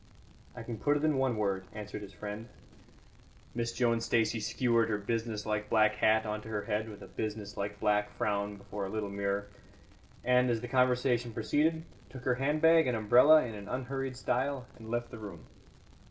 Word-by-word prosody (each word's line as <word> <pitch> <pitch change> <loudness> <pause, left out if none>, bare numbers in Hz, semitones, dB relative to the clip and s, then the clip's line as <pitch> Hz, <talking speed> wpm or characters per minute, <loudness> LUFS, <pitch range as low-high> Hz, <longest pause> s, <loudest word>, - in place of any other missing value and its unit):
"I - - -7
can 115 -3 -6
put 145 0 +2
it 145 - -4
in 155 -3 +2
one 130 -4 +1
word," 100 -3 -1
answered 105 -1 -6
his 100 -1 -9
friend. 105 +4 -7 1.1
Miss 115 -1 -2
Joan 115 -1 +1
Stacey 115 -1 +1
skewered 115 +1 +1
her 105 - +1
business 110 0 -3
like 105 -1 -2
black 110 -1 +4
hat 110 0 +3
on 105 0 -3
to - - -11
her 105 -2 -2
head 110 0 -2
with 105 - -10
a - - -10
business 105 +1 -5
like 100 0 -4
black 105 0 +2
frown 100 0 -1
before 100 0 -6
a - - -7
little 105 -1 -3
mirror, 100 0 -1 0.8
and, 125 0 +4
as 115 -1 +1
the 125 - -6
conversation 125 -2 +2
proceeded, 155 +8 +1 0.3
took 130 -1 -10
her 125 - +2
handbag 160 +3 +4
and 125 -2 +1
umbrella 125 +8 +6
in 115 - -6
an 100 -1 -8
unhurried 130 +1 -3
style, 130 +1 -1
and 110 -1 -11
left 120 0 -2
the 115 - -8
room. 100 -7 -9
110 Hz, 190 wpm, -31 LUFS, 105-125 Hz, 1.1 s, umbrella